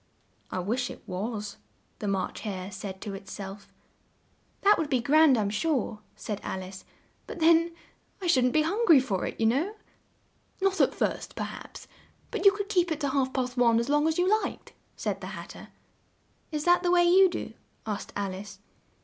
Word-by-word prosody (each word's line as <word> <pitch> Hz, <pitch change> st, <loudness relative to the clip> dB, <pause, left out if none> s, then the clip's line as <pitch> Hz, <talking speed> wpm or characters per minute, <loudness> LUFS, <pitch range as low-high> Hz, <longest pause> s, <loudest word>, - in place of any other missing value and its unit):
"I -, -, -4 dB
wish 230 Hz, +8 st, -1 dB
it -, -, -10 dB
was," 205 Hz, +2 st, -4 dB, 0.4 s
the 210 Hz, -, -3 dB
March 195 Hz, -2 st, -2 dB
Hare 195 Hz, -3 st, -5 dB
said 190 Hz, -1 st, -7 dB
to 205 Hz, -, -5 dB
it 195 Hz, 0 st, -9 dB
self. 200 Hz, 0 st, -8 dB, 0.9 s
"That 410 Hz, +1 st, +5 dB
would 315 Hz, -3 st, -1 dB
be 260 Hz, -3 st, +2 dB
grand, 285 Hz, +2 st, +5 dB
I'm 205 Hz, -2 st, 0 dB
sure," 235 Hz, -2 st, -1 dB, 0.2 s
said 210 Hz, -2 st, -5 dB
Al 190 Hz, -, -4 dB
ice: 185 Hz, +1 st, -10 dB, 0.4 s
"but -, -, -7 dB
then 335 Hz, +1 st, +4 dB, 0.4 s
I 380 Hz, -, -6 dB
shouldn't 255 Hz, -8 st, +3 dB
be 310 Hz, -, +4 dB
hun 400 Hz, +9 st, 0 dB
gry 320 Hz, -5 st, +8 dB
for 205 Hz, -8 st, -1 dB
it, -, -, -7 dB
you 225 Hz, -, +2 dB
know." 295 Hz, -, +1 dB, 0.8 s
"Not 390 Hz, 0 st, +2 dB
at -, -, +3 dB
first, -, -, -2 dB
per -, -, -3 dB
haps, -, -, -9 dB, 0.4 s
but -, -, -3 dB
you 395 Hz, -, +10 dB
could 400 Hz, 0 st, -4 dB
keep 355 Hz, -5 st, +1 dB
it 315 Hz, -, -1 dB
to 285 Hz, -, 0 dB
half 265 Hz, -1 st, +1 dB
past 250 Hz, -1 st, -2 dB
one 235 Hz, -2 st, +4 dB
as 235 Hz, +3 st, -2 dB
long 295 Hz, +1 st, +3 dB
as 320 Hz, -, 0 dB
you 355 Hz, +1 st, +2 dB
liked," -, -, -6 dB, 0.2 s
said -, -, -3 dB
the -, -, -6 dB
Hat -, -, -9 dB
ter. -, -, -11 dB, 0.8 s
"Is 300 Hz, -1 st, -2 dB
that 350 Hz, +1 st, +4 dB
the 355 Hz, -, 0 dB
way 350 Hz, 0 st, +5 dB
you 370 Hz, +2 st, +6 dB
do?" 350 Hz, -, -5 dB, 0.3 s
asked 210 Hz, -2 st, -4 dB
Al 200 Hz, -2 st, -2 dB
ice. 200 Hz, +2 st, -9 dB
260 Hz, 200 wpm, -28 LUFS, 205-335 Hz, 0.9 s, you